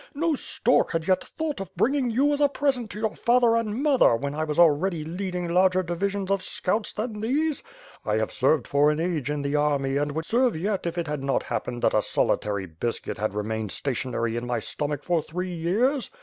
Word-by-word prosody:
No 325 +2 +1
stork 275 - +1
had 165 0 -2
yet 185 -1 +2
thought 315 -7 -4
of 195 -2 -5
bringing 270 -1 +1
you 275 +6 +2
as 290 - -1
a 290 - +6
present 270 -5 -1
to 210 - -7
your 220 -1 -1
father 240 -1 +3
and 230 +3 -1
mother, 275 - +5
when 140 +4 -3
I 155 +1 -2
was 150 -1 -3
already 170 +1 +3
leading 180 +2 -4
larger 185 +2 +3
divisions 195 +3 -2
of 195 -1 +1
scouts 210 +4 -1
than 215 0 -4
these. 290 +6 0 0.4
I 105 - 0
have 110 0 -1
served 135 0 +2
for 145 +1 +4
an 150 +1 0
age 165 -5 -1
in 145 -1 -2
the 140 +1 -1
army 140 -2 +1
and 145 0 -1
would 160 +1 -3
serve 245 +1 +2
yet 195 +1 -1
if 170 +1 -4
it 170 - -1
had 150 -2 -3
not 135 0 0
happened 120 -1 -4
that - - +3
a - - +4
solitary 100 -2 0
biscuit 95 +7 -4
had 110 -1 -2
remained 110 0 -2
sta 135 - -2
tionary 115 -2 -2
in 120 +1 -3
my 120 - 0
stomach 145 -1 -3
for 175 -2 +1
three 180 +4 -5
years. 225 - 0
175 Hz, 220 wpm, -25 LUFS, 145-220 Hz, 0.4 s, a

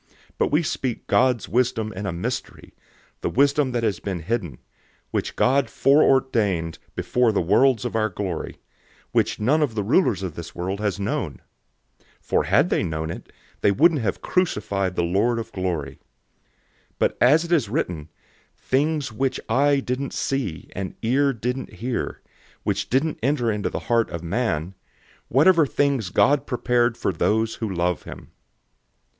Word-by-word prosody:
002:007 - - -39 0.3
But - - +3
we 155 +4 +3
speak 130 -5 -3
God's 125 -3 +2
wisdom 115 -3 0
in 100 +2 -5
a - - -1
mystery, 85 +1 -5 0.5
the - - -1
wisdom 140 0 +2
that 120 -1 -1
has 105 -5 0
been 95 -4 -4
hidden, 85 - -3 0.5
which - - -2
God 135 +2 +2
foreordained 115 - +2 0.2
before 125 -2 +2
the 105 - +1
worlds 115 +8 +3
for 120 -2 -4
our 110 -1 +1
glory, 95 -7 -4
002:008 - - -27 0.5
which - - +1
none 140 +9 +2
of 135 -7 0
the 105 - -1
rulers 115 - +2
of 90 -4 -4
this 85 +1 -9
world 95 +3 -3
has 105 -2 -1
known. 100 - -2 0.8
For - - 0
had 120 - +3
they - - +2
known 80 -2 -3
it, - - -9 0.3
they - - +4
wouldn't 150 - +4
have 100 -4 -2
crucified 100 - 0
the 85 - +1
Lord 100 +8 +1
of 115 - -5
glory. 85 -8 -3 0.9
002:009 - - -41
But - - +1
as 145 +7 +5
it 170 - -8
is 145 -12 +2
written, 90 - -2 0.5
"Things 145 0 0
which 130 +5 -1
an - - -11
eye 140 +4 +3
didn't 130 +2 -3
see, 125 -13 -3
and 95 -1 -4
an - - -33
ear 140 +5 +3
didn't 125 +2 -4
hear, 120 +1 -4 0.4
which - - -1
didn't 145 +5 0
enter 120 -2 +1
into 105 -1 -2
the - - -4
heart 115 -1 +2
of 85 0 -6
man, 85 -3 -1 0.6
these 140 - +3
God 140 +9 +4
has - - -23
prepared 120 -2 +1
for - - -1
those 110 +6 +1
who 110 -3 -2
love 90 -1 0
him." - - -11
115 Hz, 170 wpm, -23 LUFS, 95-135 Hz, 0.9 s, as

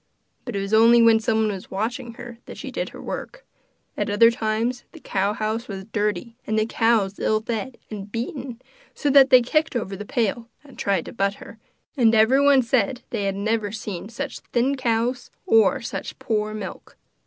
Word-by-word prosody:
But 245 - -5
it 200 - -1
was 195 +2 -4
only 230 +2 +7
when 230 -1 +6
someone 220 -1 +1
was 190 -2 -8
watching 235 +4 -3
her 235 -1 -10
that - - -9
she - - -7
did - - -3
her - - -12
work; - - -7 0.5
at - - -2
other 230 +3 +6
times 230 +2 -1
the 325 - -11
cow 200 -6 -1
house 220 +3 -3
was 195 -2 -6
dirty, 210 +2 -1
and 220 - 0
the 215 - +2
cows 225 -4 +1
ill 215 - +1
fed 235 +3 -4
and 205 -1 -7
beaten, 245 +1 -5 0.4
so 290 - 0
that 275 -1 +7
they 255 -2 +7
kicked 310 +4 0
over 200 -5 -2
the 205 - -6
pail, 230 +1 -1
and 280 -2 -16
tried 195 -4 0
to - - -9
butt 200 -2 0
her; 220 - -13 0.4
and 230 -5 +4
everyone 265 +4 +5
said 240 0 0
they 210 -4 -2
had 195 0 -1
never 210 0 -1
seen 205 -3 -6
such 245 +5 -5
thin 255 +3 0
cows 245 0 -1 0.2
or 225 +5 +4
such - - -5
poor 215 -1 -2
milk. 205 -3 -8
225 Hz, 190 wpm, -23 LUFS, 210-245 Hz, 0.5 s, only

